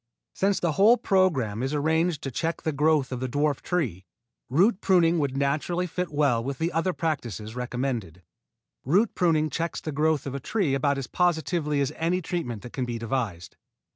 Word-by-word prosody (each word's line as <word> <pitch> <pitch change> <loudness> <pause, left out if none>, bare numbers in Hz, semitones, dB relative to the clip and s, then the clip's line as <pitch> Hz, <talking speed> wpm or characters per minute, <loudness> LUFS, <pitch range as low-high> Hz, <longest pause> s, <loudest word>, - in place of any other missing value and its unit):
Since 195 0 +1
the 170 - +1
whole 210 +9 +5
program 140 - +1
is 135 +3 -1
arranged 160 +2 +1
to 135 - -3
check 165 +7 -2
the 160 - 0
growth 150 -1 +2
of 125 - -3
the 130 0 -3
dwarf 145 +1 0
tree, 130 - -2 0.5
root 190 - +3
pruning 175 -3 +4
would 140 -2 -1
naturally 150 +6 0
fit 180 0 -3
well 140 -6 +2
with 135 +1 -4
the 165 +4 -1
other 165 +3 0
practises 120 - -3
recommended. 120 -8 -3 0.6
Root 195 - +2
pruning 155 -4 +2
checks 165 0 -2
the 155 - -5
growth 155 +1 +1
of 135 - -4
a 140 - -3
tree 180 - 0
about 140 +1 +1
as 135 - -3
positively 160 -3 0
as 135 - -1
any 170 +3 +1
treatment 160 - -4
that 120 - -10
can 130 - -2
be 120 -1 -3
devised. 110 -7 -3
150 Hz, 185 wpm, -26 LUFS, 130-170 Hz, 0.6 s, whole